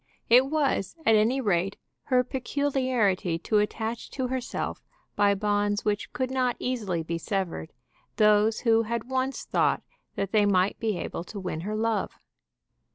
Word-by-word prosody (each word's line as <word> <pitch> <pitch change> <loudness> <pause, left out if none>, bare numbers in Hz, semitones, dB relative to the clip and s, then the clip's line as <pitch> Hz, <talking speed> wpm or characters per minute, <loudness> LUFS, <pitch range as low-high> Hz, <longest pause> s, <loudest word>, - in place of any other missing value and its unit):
It 250 +3 +7
was, 280 -10 0
at 225 - +5
any 220 +5 +3
rate, 195 -3 0 0.3
her 255 -2 +3
peculiarity 255 - 0
to 210 +5 +1
attach 220 +2 -2
to 255 -2 -1
herself, 255 -1 -3 0.3
by 205 -1 +3
bonds 205 0 0
which 210 -1 -1
could 260 0 -2
not 255 -2 +1
easily 210 -10 -2
be 165 +1 -3
severed, 180 - -3 0.4
those 215 +1 +4
who 225 -2 +4
had 235 +2 -4
once 260 +1 -1
thought - - +1 0.3
that 195 -1 -2
they 210 -2 +4
might 190 0 +2
be 220 -4 -1
able 170 - -4
to 205 - -7
win 180 -4 -4
her 210 +4 -3
love. 220 -2 -1
215 Hz, 155 wpm, -27 LUFS, 200-250 Hz, 0.4 s, It